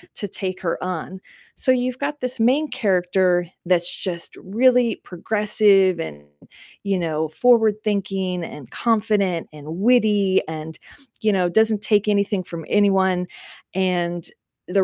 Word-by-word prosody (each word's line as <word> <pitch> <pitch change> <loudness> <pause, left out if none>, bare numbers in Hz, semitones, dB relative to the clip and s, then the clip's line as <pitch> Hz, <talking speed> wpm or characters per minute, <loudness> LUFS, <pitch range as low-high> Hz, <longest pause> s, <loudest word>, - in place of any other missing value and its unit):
to 205 - -4
take 185 -2 -5
her 170 -2 -2
on. 185 +1 -5 0.4
So 260 - +1
you've 250 0 -1
got 290 0 -3
this 250 -1 -3
main 275 +7 +2
character 180 -5 +1 0.2
that's 175 -1 +1
just 175 -3 -5
really 240 +3 +2
progressive 195 -1 +2
and, 75 - -6 0.6
you 200 -2 0
know, 160 -2 -1
forward-thinking 205 -4 +1
and 135 -5 -11
confident 210 -6 0
and 150 0 -12
witty 210 -4 +3
and, 160 0 -7 0.4
you 215 -2 +2
know, 180 -2 +1
doesn't 220 +2 +2
take 210 -1 +2
anything 200 -2 +1
from 170 -2 -8
anyone, 190 -3 +2 0.5
and 175 -2 -1 0.4
the 195 +1 +3
195 Hz, 130 wpm, -21 LUFS, 180-220 Hz, 0.6 s, witty